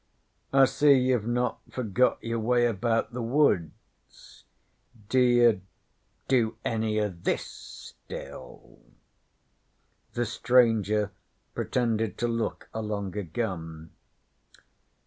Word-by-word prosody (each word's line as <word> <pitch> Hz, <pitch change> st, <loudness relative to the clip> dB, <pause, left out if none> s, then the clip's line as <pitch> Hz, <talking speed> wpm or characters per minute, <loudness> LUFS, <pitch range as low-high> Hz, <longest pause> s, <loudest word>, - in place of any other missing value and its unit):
'I 135 Hz, 0 st, +6 dB
see 145 Hz, +2 st, +4 dB
you've 125 Hz, -4 st, +2 dB
not 125 Hz, +1 st, -1 dB
forgot 125 Hz, 0 st, +1 dB
your 115 Hz, 0 st, -2 dB
way 120 Hz, +2 st, +2 dB
about 115 Hz, +1 st, 0 dB
the 125 Hz, -, -4 dB
woods. 115 Hz, -, -2 dB, 0.6 s
D'ye 120 Hz, -5 st, +4 dB, 0.7 s
do 115 Hz, -4 st, +1 dB
any 110 Hz, -1 st, 0 dB
o' 105 Hz, -1 st, 0 dB
this 85 Hz, -2 st, -2 dB, 0.6 s
still?' -, -, -10 dB, 1.3 s
The 120 Hz, -, -1 dB
stranger 110 Hz, -3 st, +2 dB, 0.4 s
pretended 115 Hz, -4 st, -1 dB
to 120 Hz, -, 0 dB
look 115 Hz, -2 st, -3 dB
along 105 Hz, -3 st, -4 dB
a 105 Hz, -, -1 dB
gun. 80 Hz, -4 st, -5 dB
115 Hz, 95 wpm, -27 LUFS, 105-125 Hz, 1.3 s, I